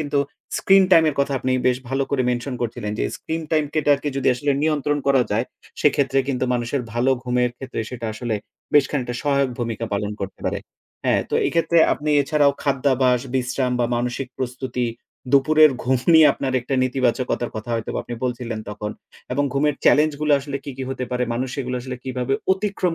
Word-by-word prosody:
কিন্তু 145 -1 -1 0.4
screen 195 0 +5
time 165 -2 +7
এর 150 - -1
কথা 140 0 0
আপনি 130 0 -1
বেশ 125 -1 +3
ভালো 135 +2 0
করে 140 -2 +1
mention 125 +2 -2
করছিলেন। 115 -2 -3
যে, - - 0
স্ক্রিন 160 +1 -4
টাইমটাকে 150 -2 +1
যদি 135 - +1
আসলে 145 +3 -1
নিয়ন্ত্রণ 150 -2 +1
করা 135 -2 +4
যায়, 110 +4 +1 0.4
সেক্ষেত্রে 140 -2 +2
কিন্তু 130 -2 0
মানুষের 120 +3 -1
ভালো 120 +3 +2
ঘুমের 125 -1 +1
ক্ষেত্রে 130 -2 -5
সেটা 120 -2 -5
আসলে 115 +1 -3 0.4
বেশ 145 -2 +7
খানিকটা 125 -4 -2
সহায়ক 140 -2 +2
ভূমিকা 115 -2 -3
পালন 100 +1 -1
করতে 95 0 -6
পারে। - - -1 0.5
হ্যাঁ, - - +3
তো, - - -1
এইক্ষেত্রে 170 0 +2
আপনি 150 +1 -2
এছাড়াও 145 0 +3
খাদ্যাভাস, 130 -3 +2
বিশ্রাম 130 0 0
বা 120 - +2
মানসিক 125 +2 -2
প্রস্তুতি, 125 -1 -2 0.5
দুপুরের 155 +3 +6
ঘুম 130 +2 +2 0.2
নিয়ে 160 -1 +8
আপনার 135 -1 -3
একটা 130 +3 -3
নেতিবাচকতার 125 -1 0
কথা 110 +2 -6
হয়তোবা 115 -1 -3
আপনি 120 - -6
বলছিলেন 120 -2 -3
তখন 105 0 -5 0.4
এবং 145 +3 +1
ঘুমের 145 +1 +2
চ্যালেঞ্জ 150 +1 +5
গুলা 150 -1 +4
আসলে 140 0 -4
কি 140 - -5
কি 135 - -5
হতে 130 -1 -3
পারে, 125 0 0
মানুষ 125 +2 -2
এগুলা 125 -1 -3
আসলে 130 0 -5
কিভাবে 130 0 -1 0.2
অতিক্রম 190 -3 -1
130 Hz, 180 wpm, -22 LUFS, 125-145 Hz, 0.5 s, নিয়ে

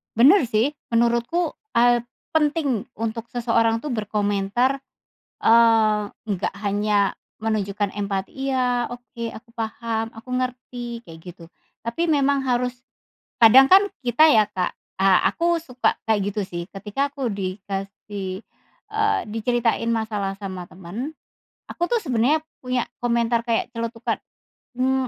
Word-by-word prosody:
Bener 270 - +6
sih, 230 +6 +2 0.2
menurutku, 235 +9 +2 0.2
eee, 240 0 +5 0.3
penting 295 -6 +1
untuk 225 +1 -3
seseorang 230 -1 +2
tuh 295 - -4
berkomentar, 210 +4 0 0.6
eee, 225 -2 +5 0.2
nggak 195 -1 -1
hanya 205 0 +1 0.2
menunjukkan 205 -2 -1
empati, 200 -1 -2 0.2
"Iya, 245 -2 +1
oke, 240 -1 -6
aku 230 +2 -12
paham, 225 0 -3
aku 230 +3 -13
ngerti," 245 -2 -4
kayak 160 -1 -11
gitu. 175 -1 -11 0.4
Tapi 235 +9 -2
memang 280 -1 +2
harus 250 -1 0 0.6
kadang 255 +4 +8
kan 390 +2 +8 0.2
kita 250 +4 +4
ya 215 -1 +4
Kak 185 -3 -2 0.2
eee, 190 -1 +5
aku 340 0 +1
suka 255 -6 -1
kayak 205 -2 +2
gitu 210 - -2
sih 175 -1 -5
ketika 210 +8 -2
aku 275 -3 -3
dikasih 195 -1 -5 0.5
eee, 425 0 +2
diceritain 230 +1 0
masalah 215 -3 -1
sama 190 -2 -5
temen, 195 - -6 0.6
aku 345 0 -2
tuh 470 - +3
sebenarnya 265 - +2 0.2
punya 250 -1 0 0.2
komentar 235 -1 +2
kayak 235 +1 -1
celetukan, 230 0 -2 0.6
mmm, 260 0 +1
230 Hz, 125 wpm, -23 LUFS, 205-255 Hz, 0.6 s, kadang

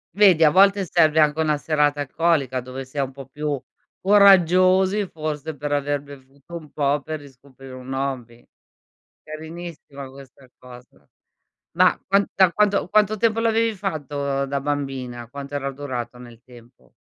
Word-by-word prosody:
Vedi 190 -6 +5
a 155 - +7
volte 195 +3 +4
serve 160 -2 +3
anche 150 0 +3
una 155 -1 +1
serata 145 -1 0
alcolica 140 -3 0
dove 130 +2 -8
si 130 +3 -14
è - - +2
un 135 -1 -3
po' 135 0 -11
più 145 0 -4 0.4
coraggiosi, 190 0 +4
forse, 155 -1 -5
per 145 +1 -5
aver 145 0 -1
bevuto 140 +3 -14
un 155 -4 -9
po' 145 0 0
per 155 +2 -6
riscoprire 135 -1 -15
un 130 +1 -8
hobby. 130 -3 -5 0.8
Carinissima 155 -3 -9
questa 135 0 -16
cosa. 125 0 -16 0.7
Ma - - +4
qua 200 +1 +3
da 190 -2 +5
quanto 205 +1 +1
quanto 215 +1 +2
tempo 225 +1 +1
l'avevi 225 -1 +1
fatto 145 -7 -3
da 140 0 -3
bambina? 135 -4 -4
Quanto 140 +2 -8
era 140 -1 -3
durato 125 -4 -6
nel 120 -2 -14
tempo? 120 -1 -19
145 Hz, 150 wpm, -22 LUFS, 135-170 Hz, 0.8 s, a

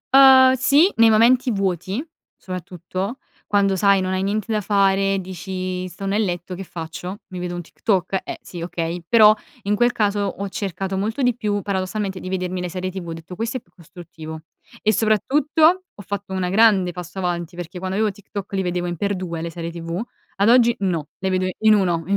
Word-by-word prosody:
Uhm, 265 -1 +8
sì, 280 +7 +4
nei 230 -1 +6
momenti 245 +3 +4
vuoti 195 - -1 0.4
soprattutto, 185 +4 -5 0.3
quando 200 -1 +2
sai, 200 +1 +4
non 185 0 -1
hai 190 0 0
niente 210 +2 -1
da 215 - +1
fare. 195 -1 +2
Dici: 185 0 -4
"Sto 180 +3 -8
nel 205 +3 +1
letto, 175 -1 -3
che 190 - -6
faccio? 175 +3 -7
Mi 185 -2 -6
vedo 175 0 -4
un 175 - -4
TikTok? 190 +1 -1
Eh, - - -6
sì, 175 - -9
okay." 170 0 -3
Però 215 0 +7 0.3
in 205 +1 +1
quel 240 +3 +3
caso 210 -3 0
ho 200 0 -3
cercato 195 0 -4
molto 220 +7 -2
di 245 -2 +2
più 210 -4 -1
paradossalmente 190 0 -3
di 185 - -6
vedermi 185 -1 -2
le 180 - -3
serie 185 +1 -3
TV. 185 -2 -7
Ho - - -3
detto, 165 +2 -9
questo 225 +5 -2
è - - -6
più - - -34
costruttivo. 160 -2 -10 0.4
E 215 - +3
soprattutto 295 - +3
ho - - -11
fatto 200 0 -6
una 185 -1 -1
grande 195 -3 +4
passo 180 +1 -8
avanti 175 -1 -3
perché 175 +1 -7
quando 190 +1 -3
avevo 215 0 +2
TikTok 200 0 -8
li 195 - +1
vedevo 180 -1 -2
in 175 - -3
x2 185 -3 -3
le 170 - -3
serie 165 0 -6
tv; 170 +2 -4 0.4
ad 200 +2 +3
oggi 240 -1 +6
no, 175 -6 -1
le 190 - -1
vedo 185 0 +1
in 220 0 +5
uno, 175 -5 +2
i 200 - +2
190 Hz, 200 wpm, -22 LUFS, 180-210 Hz, 0.4 s, Uhm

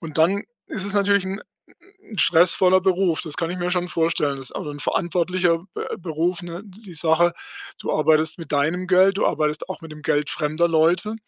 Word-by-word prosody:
Und 160 -2 -6
dann 190 +6 +3 0.2
ist 190 - -5
es 200 - -2
natürlich 200 -1 +2
'n 195 +2 -5 0.6
'n 215 - -11
stressvoller 180 +2 +5
Beruf. 185 -3 +1
Das 155 -4 -5
kann 165 -1 -2
ich - - -5
mir 175 0 -2
schon 180 0 0
vorstellen. 160 -4 0
Das 135 -1 -8
ist - - -7
auch - - -5
'n 145 0 -7
verantwortlicher 175 0 0
Be - - -5
Beruf, 170 +1 -2
ne, 175 +2 -7
die 200 -2 -13
Sache. 165 +2 +3 0.4
Du - - -4
arbeitest 155 0 +2
mit 165 - -10
deinem 160 +6 0
Geld, 190 +2 +4
du - - +2
arbeitest 150 +2 -1
auch 190 - -6
mit 160 -1 -10
dem 150 -1 -12
Geld 145 +1 0
fremder 155 +3 0
Leute. 170 +6 +1
170 Hz, 200 wpm, -22 LUFS, 160-185 Hz, 0.6 s, stressvoller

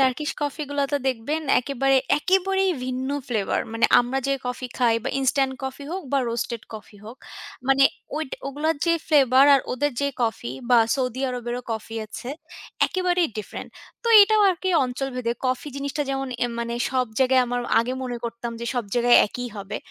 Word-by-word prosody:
Turkish 270 +3 +1
coffee 290 +1 -2
গুলো 285 0 0
তো - - +3
দেখবেন 265 +6 -2 0.2
একেবারে, 270 +1 +1 0.2
একেবারেই 385 +3 +2
ভিন্ন 255 +1 -3 0.2
ফ্লেভার। 220 -7 0
মানে 230 0 +3
আমরা 245 +2 -2
যে 275 - +2
কফি 250 +1 -4
খাই 240 -3 +3
বা - - 0
ইনস্ট্যান্ট 270 0 +1
কফি 265 +2 -5
হোক 375 +1 -4
বা 275 - +3
রোস্টেড 235 0 -3
কফি 215 -1 -11
হোক, 225 +4 -10 0.5
মানে 270 0 +5 0.3
ওইট 310 -3 -3 0.2
ওগুলার 295 +4 -1
যে 335 - +4
ফ্লেভার 270 -3 +5
আর 275 - +4
ওদের 290 +3 0
যে 280 - +1
কফি 225 - -2 0.4
সৌদি 255 -2 -2
আরবেরও 245 0 -4
কফি 225 0 -6
আছে, 230 +3 -8 0.6
একেবারেই 360 -2 +1
ডিফারেন্ট, 210 - -7 0.3
তো 470 - -1
এটাও 430 +1 +3
আরকি 370 +1 -3 0.2
অঞ্চলভেদে। 250 -1 -3
কফি 255 +3 -1
জিনিসটা 280 +1 -2
যেমন 270 0 -2 0.2
এম 240 - -2
মানে 235 0 -3 0.2
সব 255 -1 +1
জায়গায় 260 -1 +4
আমার 245 0 -2 0.2
আগে 240 +2 -2
মনে 245 -2 -3
করতাম 235 0 -5
যে, 235 - -4
সব 245 -2 -1
জায়গায় 240 0 +5
একই 245 +4 -6
হবে। 200 +1 -5
260 Hz, 170 wpm, -24 LUFS, 240-285 Hz, 0.6 s, মানে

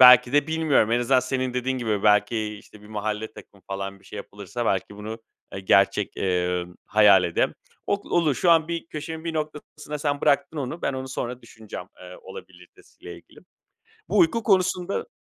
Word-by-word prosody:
belki 125 -1 +9
de 145 +1 +3
bilmiyorum. 160 -8 +2
En 120 - +3
azından 130 +1 +3
senin 130 0 -2
dediğin 130 +1 -1
gibi, 110 -4 -1
belki, 105 +1 +2
işte, 105 0 -17
bir 105 - -14
mahalle 110 +1 -3
takımı 100 -3 -15
falan 100 0 -5
bir - - -24
şey 105 - -10
yapılırsa, 105 +4 -6
belki, 95 +2 -1
bunu 110 +2 -6 0.4
ı - - -4
gerçek, 100 +1 +2
eee, 90 -1 0 0.2
hayal 100 -3 +6
edem 85 - 0 0.3
o - - +2 0.2
olur. 155 -5 +3
Şu 175 - +2
an 165 -1 +4
bir 170 -1 -3
köşemin 160 +1 -6
bir 165 -1 -3
noktasına 150 -1 -5
sen 145 -1 -1
bıraktın 140 +2 +2
onu. 140 +5 -4
Ben - - 0
onu 130 0 -5
sonra 125 -1 -4
düşüneceğim, 110 -2 -9
eee, - - -10
olabiliritesi 465 -1 -14
ile - - -7
ilgili. - - -17 0.7
Bu - - +1
uyku 235 -10 +4
konusunda 185 -2 +1
125 Hz, 180 wpm, -25 LUFS, 105-150 Hz, 0.7 s, belki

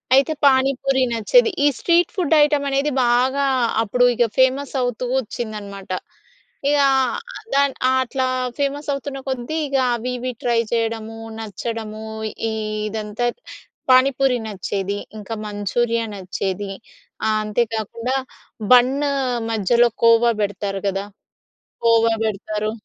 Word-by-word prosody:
అయితే, 275 +4 +3
పానీపూరి 270 0 +2
నచ్చేది. 445 - +4
ఈ - - +7
స్ట్రీట్ 345 +3 +2
ఫుడ్ 340 -5 +2
ఐటెమ్ 295 -1 +1
అనేది 275 +2 +1
బాగా 255 +4 +2 0.4
అప్పుడు 245 +3 +2
ఇక 240 - +3
ఫేమస్ 260 +1 +2
అవుతూ 245 0 -2
వచ్చిందనమాట. 210 -5 -6 0.8
ఇగా 285 -1 +4 0.7
దాన్ 280 -1 +3 0.3
అట్లా 260 +1 -1 0.3
ఫేమస్ 285 +1 -2
అవుతున్న 275 0 -5
కొద్దీ 260 +3 -3
ఇక 275 -1 0 0.2
అవి, 240 +2 -4
ఇవి 255 +1 -3
ట్రై 235 -1 +2
చేయడము, 225 -1 -2 0.2
నచ్చడము, 220 0 -5 0.5
ఇదంతా 215 +1 -3 0.7
పానిపూరి 255 0 +4
నచ్చేది. 200 0 -3 0.2
ఇంకా 210 +2 -6
మంచూరియా 230 +3 -1
నచ్చేది. 195 +1 -4 0.6
ఆహ్, 215 0 +2
అంతేకాకుండా 230 +3 -2 0.6
బన్ను 270 +4 +4 0.4
మధ్యలో 235 +3 +3
కోవా 230 +1 +6
పెడతారు 200 -1 -2
కదా! 195 0 -2 0.8
కోవా 230 0 +4
పెడతారు. 215 0 -2
235 Hz, 110 wpm, -21 LUFS, 215-270 Hz, 0.8 s, ఈ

